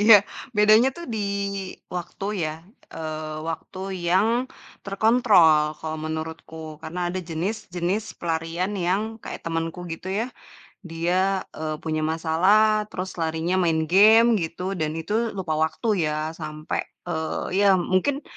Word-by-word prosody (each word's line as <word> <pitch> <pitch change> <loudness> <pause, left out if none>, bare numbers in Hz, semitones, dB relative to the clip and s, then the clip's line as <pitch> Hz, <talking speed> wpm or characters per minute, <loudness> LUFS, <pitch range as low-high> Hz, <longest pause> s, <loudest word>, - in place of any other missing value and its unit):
Iya, 215 +1 +9 0.4
bedanya 215 +4 +6
tuh 345 - -7
di - - -2 0.8
waktu 180 +2 -5 0.2
ya, 155 - -3 0.4
eee, 155 -1 -5
waktu 165 +3 -6 0.3
yang 225 +8 +2 0.4
terkontrol, 195 -8 +4
kalau 160 0 -4
menurutku. 160 0 -6
Karena 175 +2 -3
ada 185 - -2
jenis-jenis 180 +3 -3
pelarian 165 +3 -2
yang 190 +4 +2 0.2
kayak - - -7
temenku 165 +1 -3
gitu 170 +3 -7
ya, 210 +5 0 0.6
dia, 180 +4 +1
eee, 155 -1 -4
punya 155 -1 -1
masalah, 205 +7 +3
terus 185 0 -5
larinya 165 +2 0
main 165 -3 +2
game 220 +5 +7
gitu, 180 +3 -3
dan 155 -1 -1
itu 215 +8 -1
lupa 175 -5 -2
waktu 160 +9 -1 0.2
ya. 155 +1 -1
Sampai, 155 -1 -4 0.2
eee, 160 +3 -2
ya - - +6
mungkin 185 - +1
175 Hz, 125 wpm, -24 LUFS, 160-200 Hz, 0.8 s, Iya